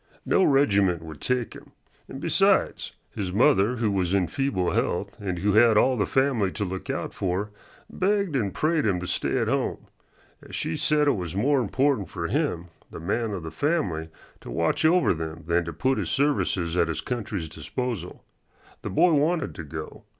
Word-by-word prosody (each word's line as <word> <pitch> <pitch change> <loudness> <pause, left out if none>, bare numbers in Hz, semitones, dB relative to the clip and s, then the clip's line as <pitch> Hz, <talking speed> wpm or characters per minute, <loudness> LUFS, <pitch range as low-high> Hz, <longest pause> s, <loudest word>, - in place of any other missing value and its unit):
No 190 - +3
regiment 100 - +3
would 80 -2 -10
take 125 -2 -1
him, - - -14 0.3
and - - -8
besides, - - +2 0.2
his 95 -3 -4
mother, 120 +1 +3
who 115 -3 0
was 95 -1 0
in 95 -2 +2
feeble 95 - -1
health 100 +3 -1
and 95 -3 -3
who 100 +3 +1
had 110 0 +6
all 130 +4 +4
the 105 - 0
family 130 -8 +1
to 105 - -2
look 95 0 -6
out - - -3
for, 95 +3 -2 0.4
begged 200 -4 0
and 105 -7 0
prayed 155 - +1
him 95 -4 +1
to - - -4
stay - - -1
at - - 0
home, - - -1 0.6
as - - -9
she 80 - -2
said 150 -1 +2
it - - +5
was 90 -3 -4
more 135 +6 +2
important 125 - 0
for 85 -2 -4
him, 105 - -1 0.2
the - - -9
man 110 +7 -1
of 95 -5 -5
the 80 - -6
family, 95 - -1 0.3
to - - -11
watch 85 - 0
over 175 - +4
them 80 0 -6
than 85 +1 +1
to 85 - -4
put 130 - 0
his - - -2
services 100 - +1
at 85 - +3
his 80 - -3
country's 105 -8 -4
disposal. 90 - -5 0.6
The - - -5
boy 170 - +4
wanted 150 - +1
to 80 - -7
go. 80 +1 -8
100 Hz, 190 wpm, -25 LUFS, 85-135 Hz, 0.6 s, had